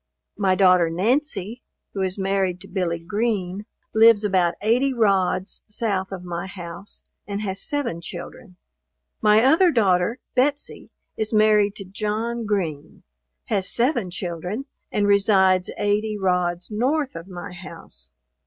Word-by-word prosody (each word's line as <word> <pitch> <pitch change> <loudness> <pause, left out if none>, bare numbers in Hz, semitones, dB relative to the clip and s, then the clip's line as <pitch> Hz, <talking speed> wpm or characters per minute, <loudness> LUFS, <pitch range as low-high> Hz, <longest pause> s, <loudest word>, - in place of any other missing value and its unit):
My 195 -2 +2
daughter 180 -3 +5
Nancy, 230 - -1 0.3
who 195 - -3
is 185 0 -1
married 190 -2 0
to - - -10
Billy 180 -3 -1
Green, 200 +1 -2 0.3
lives 220 -1 +6
about 185 -4 +2
80 250 +5 +2
rods 195 -3 +1
south 205 -3 -2
of 185 -2 -6
my 175 +1 -5
house, 175 +1 -7 0.2
and 200 +1 -3
has 195 -1 -2
seven 260 - -2
children. 175 +1 -9 0.7
My 215 +1 +5
other, 320 +7 +5
daughter, 205 - +2 0.2
Betsey, 280 +3 -1 0.3
is 220 -1 -1
married 215 -2 +4
to 195 - -8
John 215 +4 -3
Green, 160 -7 -3 0.4
has 190 - +3
seven 240 - +1
children, 180 +7 -4 0.3
and 205 - +1
resides 195 -2 +4
80 210 +1 0
rods 180 -1 -1
north 265 - 0
of 165 +2 -8
my 180 0 -8
house. 165 - -10
200 Hz, 135 wpm, -23 LUFS, 180-220 Hz, 0.7 s, lives